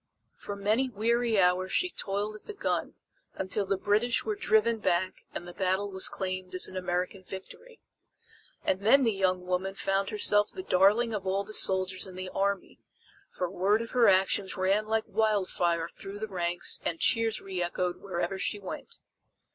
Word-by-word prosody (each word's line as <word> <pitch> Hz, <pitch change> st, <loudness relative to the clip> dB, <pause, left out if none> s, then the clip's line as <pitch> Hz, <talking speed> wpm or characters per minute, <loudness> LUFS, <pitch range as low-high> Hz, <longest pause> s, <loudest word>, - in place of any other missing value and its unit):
For 205 Hz, -, -7 dB
many 215 Hz, +6 st, +1 dB
weary 230 Hz, 0 st, +1 dB
hours 185 Hz, +1 st, +3 dB
she 360 Hz, -1 st, +1 dB
toiled 205 Hz, -2 st, -2 dB
at 215 Hz, -, -12 dB
the 430 Hz, -, -7 dB
gun, 400 Hz, -, -2 dB, 0.4 s
until 190 Hz, +1 st, -2 dB
the 195 Hz, 0 st, +1 dB
British 215 Hz, +5 st, +1 dB
were 215 Hz, -, 0 dB
driven 220 Hz, +2 st, +2 dB
back 185 Hz, -2 st, 0 dB
and 175 Hz, -, -6 dB
the 175 Hz, -, -9 dB
battle 190 Hz, +1 st, 0 dB
was 190 Hz, 0 st, +2 dB
claimed 185 Hz, -1 st, -4 dB
as 185 Hz, -, +3 dB
an 190 Hz, -, -10 dB
American 180 Hz, +1 st, -2 dB
victory. 315 Hz, -, -10 dB, 0.8 s
And 190 Hz, -, +1 dB
then 265 Hz, +7 st, +5 dB
the 230 Hz, -, +3 dB
young 185 Hz, -2 st, 0 dB
woman 185 Hz, +2 st, -1 dB
found 195 Hz, 0 st, 0 dB
herself 210 Hz, -1 st, +3 dB
the 375 Hz, -, -7 dB
darling 210 Hz, -, +3 dB
of 195 Hz, -3 st, -3 dB
all 195 Hz, +1 st, +1 dB
the 215 Hz, -, -11 dB
soldiers 185 Hz, -1 st, +1 dB
in 185 Hz, -, -10 dB
the 185 Hz, 0 st, -5 dB
army, 200 Hz, 0 st, -2 dB, 0.5 s
for 180 Hz, -, -3 dB
word 195 Hz, +5 st, +1 dB
of 230 Hz, -, -9 dB
her 240 Hz, -4 st, +5 dB
actions 190 Hz, 0 st, +2 dB
ran 195 Hz, +3 st, +2 dB
like 220 Hz, 0 st, 0 dB
wildfire 185 Hz, -6 st, +1 dB
through 195 Hz, +3 st, -9 dB
the 220 Hz, +1 st, -4 dB
ranks 175 Hz, -3 st, 0 dB
and 165 Hz, -, -2 dB
cheers 225 Hz, -2 st, +2 dB
reechoed 180 Hz, -1 st, -3 dB
wherever 190 Hz, 0 st, -3 dB
she 210 Hz, -, -1 dB
went. 195 Hz, -3 st, -8 dB
195 Hz, 175 wpm, -29 LUFS, 185-215 Hz, 0.8 s, then